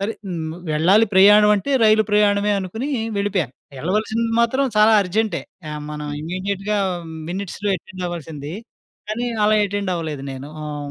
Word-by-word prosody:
సరే 200 +3 -1
హ్మ్. 160 -4 -4 0.2
వెళ్ళాలి 190 +9 +4
ప్రయాణమంటే 210 +4 +6
రైలు 215 0 +5
ప్రయాణమే 205 0 +3
అనుకుని 220 +9 -4 0.3
వెళ్ళిపోయ. 200 -3 0 0.3
వెళ్ళవలసింది 215 - -1
మాత్రం 260 +4 +2
చాలా 215 +1 +6
అర్జెంటే 210 +4 -1 0.3
ఆహ్, 150 - -5
మనం 150 0 -5
ఇమ్మీడియేట్‌గా 195 +5 -2 0.5
మినిట్స్‌లో 200 +2 -4
యటెండ్ 185 +1 -9
అవ్వాల్సింది. 160 -3 -6 0.6
కానీ 230 +3 -2 0.2
అలా 215 +1 +4
యటెండ్ 200 -2 -2
అవ్వలేదు 155 -5 -4
నేను. 135 +2 -8 0.2
ఆహ్ 145 -1 -5
200 Hz, 130 wpm, -21 LUFS, 165-210 Hz, 0.6 s, ప్రయాణమంటే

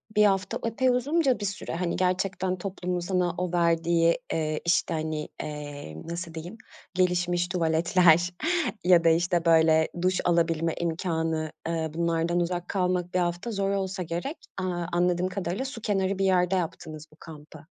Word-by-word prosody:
1 210 0 +6
hafta 195 -2 +1
epey 240 +3 +1
uzunca 265 +1 +2
bir 205 - -3
süre 190 -4 -4
hani 175 0 -1
gerçekten 185 0 0
toplumun 180 -1 -3
sana 175 -1 0
o 180 -1 -2
verdiği, 170 0 +2
eee, 155 -1 -1
işte, 170 0 +2
hani, 155 -1 -3
eee, 145 - -7
nasıl 170 0 -5
diyeyim 170 +7 -7 0.4
gelişmiş 175 -1 +1
tuvaletler 170 0 +3 0.5
ya 175 -1 +5
da, 165 - +5
işte, 170 +1 +1
böyle, 160 -1 +5
duş 185 +1 +1
alabilme 165 -1 +2
imkânı, 160 -2 -1 0.2
ııı, 160 -2 -2
bunlardan 170 +1 0
uzak 175 0 -2
kalmak 180 -2 0
1 185 - +2
hafta 175 +6 -2
zor 195 -2 -1
olsa 190 -1 -2
gerek. 175 - -4 0.2
Aaa, 180 -2 -2
anladığım 175 +1 +1
kadarıyla 185 +5 -3
su 255 -4 -7
kenarı 195 -2 0
bir 195 - +2
yerde 185 0 +3
yaptınız 160 -3 -4
bu - - -19
kampı 155 -1 -12
175 Hz, 155 wpm, -27 LUFS, 165-185 Hz, 0.5 s, 1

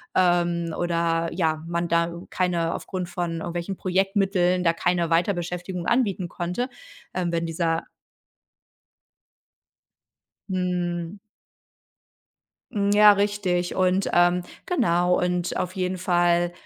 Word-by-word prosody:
Ähm, 175 -2 +2
oder 170 -1 0
ja, 160 -3 0
man 170 0 -1
da 170 0 +1 0.2
keine 175 -3 0
aufgrund 185 -2 -5
von 170 -2 -3
irgendwelchen 175 +3 -4
Projektmitteln 190 -1 +1
da 165 -1 +3
keine 175 0 0
Weiterbeschäftigung 175 +1 -1
anbieten 205 -7 +1
konnte, 180 +10 -3 0.4
ähm, 180 -2 -1
wenn 170 0 -1
dieser 165 0 -1 2.7
Mhm. 180 0 -2 1.5
Hm, 200 -1 0
ja, 210 0 +8
richtig. 200 -3 0
Und, 185 +1 +2
ähm, 175 +1 +4 0.2
genau. 180 - +2
Und 180 0 -1
auf 180 0 -3
jeden 185 0 -1
Fall, 175 -1 +2
175 Hz, 105 wpm, -24 LUFS, 170-185 Hz, 2.7 s, ja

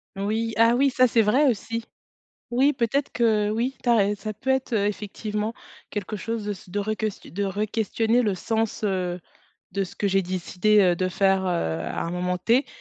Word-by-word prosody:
Oui, 220 +3 -1
ah 230 +1 +5
oui 275 +2 +3
ça 255 0 +4
c'est 230 -1 +3
vrai 265 +8 +4
aussi. 230 0 -2 0.7
Oui 265 +5 +3
peut-être 260 +3 0
que 220 -3 +2
oui, 235 +5 -1
tu - - -3
as 235 - +6
rai 205 -1 +3
ça 215 +1 -5
peut 240 +6 -3
être, 265 -2 0
heu, 205 -2 +2
effectivement, 210 +1 -3 0.3
quelque 205 0 -4
chose 225 +1 -4
de 210 - -3
s 195 -2 -7
de 195 +3 -3
reques 215 0 -3
de 200 +4 -1
requestionner 220 +3 0
le 210 -5 +1
sens, 220 +3 -2
heu, 180 -3 -1 0.5
de 200 +1 0
ce 180 - -12
que 205 - 0
j'ai 195 0 +3
décidé, 185 +3 +2
heu, 180 -3 +4
de 185 +1 0
faire, 195 +1 +2
heu, - - +1
à 85 - -2
un 170 - -3
moment 180 +1 -1
T. 235 +9 +2
210 Hz, 200 wpm, -25 LUFS, 195-230 Hz, 0.7 s, as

